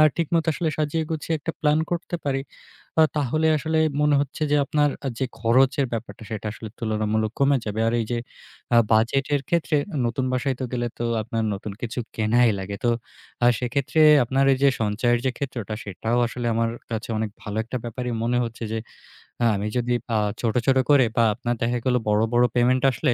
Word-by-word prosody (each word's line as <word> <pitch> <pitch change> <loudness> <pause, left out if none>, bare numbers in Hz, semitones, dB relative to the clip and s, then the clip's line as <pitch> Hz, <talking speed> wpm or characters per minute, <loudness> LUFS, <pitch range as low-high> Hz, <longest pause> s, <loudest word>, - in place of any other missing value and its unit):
আ - - +8
ঠিকমত 165 -1 +1
আসলে 160 +1 -1
সাজিয়ে 155 +1 0
গুছিয়ে 160 +1 -2
একটা 165 +3 -4
প্ল্যান 150 0 +3
করতে 175 0 -2
পারি। 135 -1 0 0.6
আ - - +8
তাহলে 150 +3 +1
আসলে 160 +3 -1 0.2
মনে 150 0 +3
হচ্ছে 145 +2 -4
যে, 150 - +4
আপনার 145 +1 +2 0.2
আ - - +1
যে 135 - 0 0.2
খরচের 130 +4 +3
ব্যাপারটা 115 0 -5
সেটা 110 -1 -4
আসলে 110 0 -8
তুলনামূলক 110 0 -1
কমে 140 0 +4
যাবে। 105 +1 -3
আর - - -1
এই - - -1
যে 120 - 0 0.6
আ - - +6 0.2
বাজেটের 135 +6 +2
ক্ষেত্রে 170 -2 +1 0.2
অ - - -1
নতুন 130 +2 -1
বাসায় 130 +1 0
তো - - -1
গেলে 120 -1 -1
তো 120 - -2 0.2
আপনার 110 +1 -2
নতুন 100 +1 -6
কিছু 120 +1 -4 0.2
কেনাই 115 +2 +3
লাগে। 100 +1 -5
তো 120 - +4 0.5
আ - - +6
সেক্ষেত্রে 130 +5 0 0.2
আপনার 135 +3 +1
এই 130 - +1
যে 140 - +7
সঞ্চয়ের 115 +3 +1
যে - - +3
ক্ষেত্রটা 120 -6 -4
সেটাও 110 +5 -2
আসলে 120 0 -4
আমার 115 0 +1 0.2
কাছে 110 0 -4
অনেক 110 -1 -2
ভালো 105 +1 -5
একটা 120 +3 -5
ব্যাপারই 125 +1 -4
মনে 120 +1 +1
হচ্ছে। 115 0 -6
যে 115 - -1 0.8
আমি 100 +1 -2
যদি 120 0 0 0.2
আ - - +3 0.2
ছোট, 115 -3 0
ছোট 135 -1 +4
করে 140 -3 +6
বা 115 - +5
আপনার 120 0 -2
দেখা 120 +1 +1
গেল 125 -1 +3
বড়, 105 +1 +3
বড় 120 +1 +5
পেমেন্ট 125 +1 +3
আসলে 120 - +1
120 Hz, 195 wpm, -24 LUFS, 115-140 Hz, 0.8 s, আ